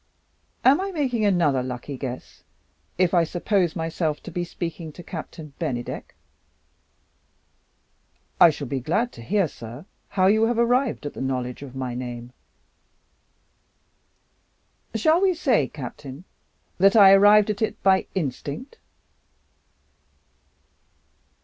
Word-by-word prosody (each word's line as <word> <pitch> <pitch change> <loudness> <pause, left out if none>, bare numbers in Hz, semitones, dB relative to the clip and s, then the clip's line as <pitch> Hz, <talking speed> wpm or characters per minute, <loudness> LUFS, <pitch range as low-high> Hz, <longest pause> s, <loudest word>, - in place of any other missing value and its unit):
"Am 280 +7 +6
I 395 - -2
making 255 - 0
another 170 -9 +2
lucky 125 +2 -5
guess 130 -1 -7 0.6
if 180 0 +2
I 175 -2 +5
suppose 175 +1 0
myself 160 -2 -2
to 180 - -8
be 175 +1 -2
speaking 170 -2 -6
to 175 - -11
Captain 160 -4 -8
Bennydeck?" 130 -7 -4 2.2
"I 170 - +9
shall 145 -2 -4
be 135 +1 -3
glad 205 - 0
to - - -12
hear, 190 - +1
sir, 120 +3 -10 0.2
how 185 -2 +1
you 220 +3 +4
have 240 0 0
arrived 245 - +1
at 145 - -4
the - - -7
knowledge 125 -1 -3
of 135 -2 -9
my 130 -2 -3
name." 120 0 -6 2.6
"Shall 325 +2 +3
we 380 -2 +3
say, 245 - +2
Captain, 135 +2 -9 0.6
that 195 +3 +5
I 200 -3 +9
have 195 0 +7
arrived 210 +1 +6
at 205 - -6
it 220 - -2
by 190 -1 +3
instinct?" 160 - -4
170 Hz, 125 wpm, -24 LUFS, 135-210 Hz, 2.6 s, I